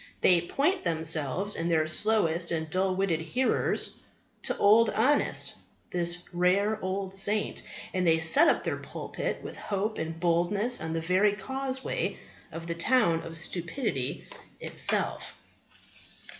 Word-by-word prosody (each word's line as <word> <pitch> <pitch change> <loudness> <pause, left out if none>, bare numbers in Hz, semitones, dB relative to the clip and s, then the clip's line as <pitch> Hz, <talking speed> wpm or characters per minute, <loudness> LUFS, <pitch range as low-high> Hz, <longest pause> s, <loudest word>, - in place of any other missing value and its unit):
They 175 -2 +5
point 290 - 0
themselves 160 +2 +1
and 165 +1 -2
their 160 -2 +2
slowest 170 -1 +3
and 160 -1 -2
dullest 185 +3 0
witted 180 -5 0
hearers 250 +11 -1 0.4
to - - -2
Old 220 +3 +5
Honest, 265 +7 +1 0.4
this 175 0 -1
rare 195 +5 +1
old 190 0 -3
saint; 205 +2 -1 0.3
and 185 -1 0
they 160 0 +4
set 275 - +5
up - - +2
their - - -2
pulpit - - -5
with - - -8
hope 210 +2 -3
and 160 0 -5
boldness 180 +8 0
on 160 0 -4
the 165 - -2
very 185 +5 +2
causeway 265 +5 -3 0.3
of 165 0 -7
the 170 - -3
town 170 -2 +2
of 165 0 -5
Stupidity 170 - -2 0.3
itself. - - 0
180 Hz, 135 wpm, -28 LUFS, 165-210 Hz, 0.4 s, They